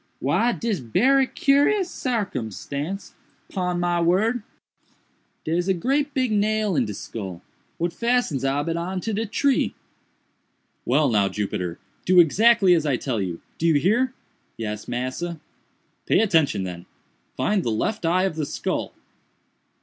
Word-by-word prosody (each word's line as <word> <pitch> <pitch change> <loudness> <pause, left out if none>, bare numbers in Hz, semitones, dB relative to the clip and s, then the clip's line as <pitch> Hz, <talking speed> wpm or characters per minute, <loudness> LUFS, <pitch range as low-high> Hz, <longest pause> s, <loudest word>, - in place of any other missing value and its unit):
Why 235 +2 +2
dis 225 -6 -2
berry 255 - +3
curous 290 +11 +2
sarcumstance, 165 - -4 0.4
pon 180 -2 -2
my 175 -1 +1
word—dare's 180 -3 -3
a 190 - +2
great 280 - 0
big 255 -3 +1
nail 215 -1 +1
in 130 -4 +2
de 105 - -5
skull, 95 -7 -7 0.3
what 170 0 -1
fastens 235 - 0
ob 140 +3 0
it 165 0 -1
on 185 +2 -3
to 225 - -3
de 220 +2 -1
tree." 270 +5 +1 1.1
"Well 145 +4 +3
now, 105 -5 +2
Jupiter, 90 -4 -3 0.3
do 185 0 +5
exactly 200 +3 +5
as 165 -3 +2
I 140 -4 +1
tell 120 -6 -2
you—do 95 - -4
you 160 - +4
hear?" 235 - +2 0.4
"Yes, 105 -2 -5
massa." 130 +8 -3 0.7
"Pay - - +4
attention, 160 - +2
then—find 95 - -4
the 120 - -2
left 175 - -1
eye 175 +3 +2
of 190 -5 -1
the 155 - -1
skull." - - -3
175 Hz, 135 wpm, -24 LUFS, 135-220 Hz, 1.1 s, do